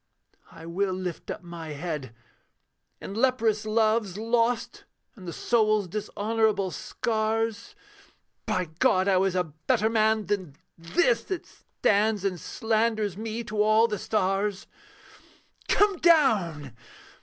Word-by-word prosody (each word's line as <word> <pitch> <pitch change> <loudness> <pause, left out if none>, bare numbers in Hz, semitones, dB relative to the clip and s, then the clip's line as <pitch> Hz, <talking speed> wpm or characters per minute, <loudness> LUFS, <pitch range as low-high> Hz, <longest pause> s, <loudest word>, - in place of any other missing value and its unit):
I - - -12
will 185 +3 -1
lift 185 -3 -5
up 200 - -5
my 170 -3 -7
head: 145 -6 -5 0.8
in - - -7
leprous 225 -3 +1
loves 215 -3 +1
Lost, 230 +1 0 0.3
and 190 -5 -12
the - - -3
soul's 215 -1 +1
dishonourable 210 0 -1
scars 225 - -2 0.7
By 185 0 0
God 185 +1 +3
I 190 -2 +4
was 190 0 +1
a 180 - +2
better 160 +7 -1
man 220 -1 +2
than 185 -8 -3 0.2
This 350 - +1
That 375 -3 -4
stands 210 -1 0
and 185 -3 -1
slanders 220 -3 0
me 225 +2 -4
to 210 -1 -2
all 215 +2 +4
the 210 -3 -3
stars. 195 0 -1 1.0
'Come 410 -2 +3
down!' 210 - +3
210 Hz, 120 wpm, -26 LUFS, 185-225 Hz, 1.0 s, I